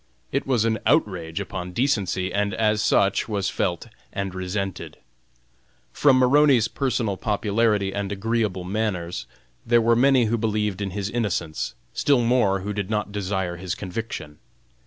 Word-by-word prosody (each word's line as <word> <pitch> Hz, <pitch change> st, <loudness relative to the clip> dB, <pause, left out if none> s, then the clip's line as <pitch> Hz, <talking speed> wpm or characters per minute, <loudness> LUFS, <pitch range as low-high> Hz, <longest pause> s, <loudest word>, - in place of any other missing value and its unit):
It 140 Hz, -, -1 dB
was 120 Hz, -5 st, +2 dB
an 110 Hz, -1 st, +1 dB
outrage 95 Hz, -, +1 dB
upon 90 Hz, -2 st, -5 dB
decency, 100 Hz, -7 st, 0 dB
and 100 Hz, -1 st, 0 dB
as 110 Hz, -1 st, +2 dB
such 100 Hz, +1 st, +2 dB
was 100 Hz, -3 st, -1 dB
felt 85 Hz, +2 st, -1 dB, 0.3 s
and 100 Hz, -2 st, -3 dB
resented. 95 Hz, +1 st, -4 dB, 1.0 s
From 140 Hz, -3 st, +4 dB
Maroney's 130 Hz, -2 st, +5 dB
personal 120 Hz, -7 st, -1 dB
popularity 105 Hz, -1 st, +1 dB
and 100 Hz, -1 st, -3 dB
agreeable 105 Hz, -2 st, -1 dB
manners, 90 Hz, -, -2 dB, 0.4 s
there 120 Hz, 0 st, +4 dB
were 115 Hz, +1 st, +3 dB
many 130 Hz, 0 st, +4 dB
who 115 Hz, +1 st, 0 dB
believed 105 Hz, -3 st, -1 dB
in 100 Hz, -, -1 dB
his 100 Hz, +1 st, -4 dB
innocence, 100 Hz, -9 st, -2 dB, 0.2 s
still 140 Hz, -4 st, +2 dB
more 115 Hz, -5 st, +2 dB
who 105 Hz, +2 st, -3 dB
did 100 Hz, -1 st, -3 dB
not 105 Hz, -1 st, -1 dB
desire 95 Hz, -3 st, -2 dB
his 90 Hz, 0 st, -4 dB
conviction. 95 Hz, -6 st, -6 dB
105 Hz, 145 wpm, -24 LUFS, 95-115 Hz, 1.0 s, Maroney's